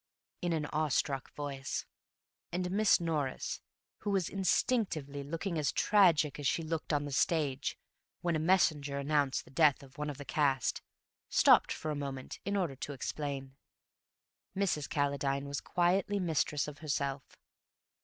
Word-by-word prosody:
in 175 - 0
an 155 -2 0
awe 155 +1 +2
struck 135 -1 0
voice, 140 -2 -4 0.7
and 180 +1 -2
Miss 210 +1 +4
Norris, 155 -6 -2 0.4
who - - -3
was 195 -4 +1
instinctively 185 - 0
looking 165 +4 -3
as 145 -2 +1
tragic 170 -9 +4
as 145 - 0
she 165 - +1
looked 160 0 -3
on 145 -1 +1
the 145 - -5
stage 140 -2 0 0.4
when 170 -1 +1
a - - +1
messenger 155 -5 +2
announced 140 -1 +1
the - - -16
death 145 -1 +4
of 135 +1 -15
one 150 0 -2
of 145 - -5
the 145 - -8
cast, 135 -5 +1 0.5
stopped - - +5
for 155 - -3
a - - -2
moment 135 -2 -5
in 200 +1 0
order 170 -8 -1
to 145 - -5
explain. 135 0 -4 1.0
Mrs. 175 -8 0
Calladine 140 -1 0
was 140 0 -3
quietly 190 +3 +1
mistress 155 -4 0
of 150 -1 -8
herself. 140 -2 -3
150 Hz, 155 wpm, -32 LUFS, 140-170 Hz, 1.0 s, stopped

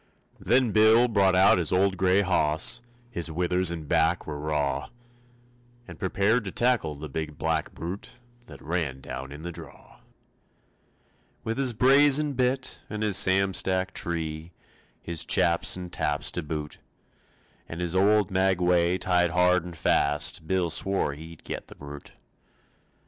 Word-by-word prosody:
Then 125 -1 +2
Bill 110 +3 +5
brought 100 -5 +2
out 95 0 +5
his 85 - 0
old 95 +1 +2
gray 95 +1 +2
hoss, 80 0 +1 0.3
His 85 -6 -1
withers 90 +2 0
and 80 -3 -5
back 80 +3 +1
were 75 -1 -6
raw, 75 -2 -2 1.0
And - - -11
prepared 100 +5 +1
to 95 - -4
tackle 120 -11 0
the 75 +2 -8
big 75 +1 -5
black 80 -1 -2
brute 85 +5 -7 0.3
That - - -13
ran 80 -5 -2
down 65 +1 -7
in 75 +2 -10
the 85 - -5
draw. - - -13 1.4
With 115 +4 -3
his 130 -3 +1
brazen 140 +4 +4
bit 130 0 -1
and 105 0 -4
his 105 -3 0
Sam 95 0 +3
Stack 95 +1 -1
tree 80 -1 -4 0.5
His 85 -2 -2
chaps 85 +1 +2
and 90 -1 -8
taps - - -1
to 90 - -3
boot, 75 -1 -6 0.9
And 85 - -7
his 90 0 -2
old 100 +1 +3
maguey 90 -2 +2
tied 90 -2 +1
hard 90 +1 +2
and 85 -1 -9
fast, 75 +1 +1
Bill 90 -2 0
swore 95 -6 0
he'd 80 +2 -12
get - - -6
the - - -13
brute. 70 0 -11
90 Hz, 150 wpm, -26 LUFS, 80-100 Hz, 1.4 s, Bill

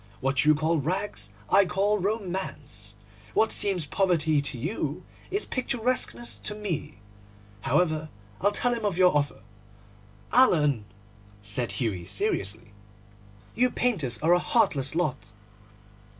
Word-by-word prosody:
What 135 +1 +1
you 155 0 +6
call 155 +2 +1
rags 160 - -1 0.2
I 200 - +6
call 195 +3 +1
romance. 180 - -4 0.4
What 220 - +3
seems 190 -6 0
poverty 160 -4 +2
to 140 -3 -3
you 160 - -3 0.3
is 405 +3 -1
picturesqueness 170 - -2
to 210 - -3
me. 200 - -4 0.6
However, 155 - +1 0.3
I'll 205 +2 +3
tell 245 +4 +2
him 230 -2 -3
of 200 -4 0
your 180 -3 +5
offer.' 145 -1 -1 0.9
'Alan,' 150 - +4 0.6
said 100 +1 -1
Hughie 100 -6 -2
seriously, 100 +2 -2 0.8
'you 250 +2 +3
painters 175 - 0
are 165 +2 +5
a 175 - +4
heartless 155 - +1
lot. 130 - -1
160 Hz, 120 wpm, -27 LUFS, 120-205 Hz, 0.9 s, you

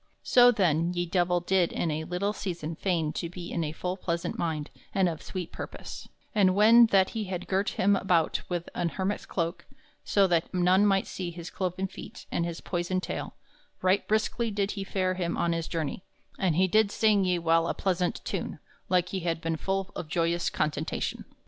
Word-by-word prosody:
So 245 -1 +7
then 175 -5 +2
ye 175 0 0
Divell 175 0 +1
did 180 -1 +2
in 165 - -1
a 155 +1 -3
little 195 +4 -1
season 170 -5 -4
feign 165 -4 0
to 170 - -3
be 175 0 -8
in 170 - -1
a 150 - -2
full 180 +3 -3
plaisaunt 170 -2 -3
mind 155 -3 -2 0.2
and 190 -2 +4
of 165 -3 -3
sweet 185 -3 -5
purpose; - - -8 0.2
and 190 -3 +4
when 230 +3 +7
that 195 -3 +3
he 220 -2 -3
had 185 -2 -5
girt 195 +1 +1
him 200 +1 +4
about 180 -4 +1
with 175 -1 -2
an 175 -1 0
hermit's 190 +4 -3
cloak, 170 0 -3 0.4
so 200 -1 +3
that 170 -3 +1
none 185 +3 +4
might 195 -1 +2
see 180 -2 -5
his 170 0 -8
cloven 185 0 -2
feet 190 - -9
and 170 - 0
his 170 -1 -6
poyson 175 +1 -1
taile, - - -5 0.5
right 185 +2 +2
briskly 220 +2 +1
did 200 -1 -1
he 195 - -4
fare 185 -1 0
him 175 -2 -2
on 170 0 +1
his 165 -1 -2
journey, 165 +2 -3 0.4
and 180 -5 +2
he 185 +2 +4
did 215 +2 +4
sing 210 -1 +3
ye 180 -1 +2
while 165 0 +2
a - - -1
plaisaunt 180 -2 -1
tune, - - -3 0.3
like 180 -1 +2
he 190 - -2
had 170 -2 -1
ben 165 0 -1
full 195 +4 -2
of 160 - -5
joyous 170 +2 0
contentation. 150 0 -2
180 Hz, 200 wpm, -28 LUFS, 170-195 Hz, 0.5 s, So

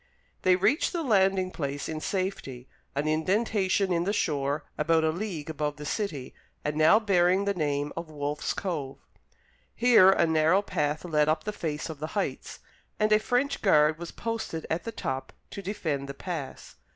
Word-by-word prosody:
They 185 -1 +4
reached 260 - +2
the 340 -2 -1
landing 190 -6 +2
place 140 -3 -4
in 155 -1 -4
safety, 185 -11 -3 0.3
an 145 +2 -1
indentation 190 +3 +1
in 170 0 +1
the 195 - 0
shore 145 -6 0
about 160 +1 +2
a 160 - +2
league 175 -4 -5
above 150 -2 -2
the 150 - -9
city 150 - -3 0.3
and 150 0 -1
now 155 +7 +6
bearing 190 -2 +3
the 200 - +1
name 145 -4 -1
of 170 -1 -6
Wolfe's 145 -1 -3
Cove. 150 -8 -4 0.8
Here 230 -6 +6
a 190 - +4
narrow 160 +4 +3
path 150 -4 -2
led 150 -3 +2
up 155 - +1
the 210 - -4
face 155 -6 -3
of 160 -3 -7
the 155 - -3
heights, 200 - -3 0.4
and 215 0 +2
a 215 - +6
French 250 +5 0
guard 155 -5 +4
was 170 -1 -6
posted 225 -8 -4
at 165 +6 -1
the 230 - -3
top 135 -10 -4 0.2
to 200 - -6
defend 160 -9 -3
the 140 - -6
pass. 160 -4 -6
165 Hz, 175 wpm, -27 LUFS, 150-195 Hz, 0.8 s, now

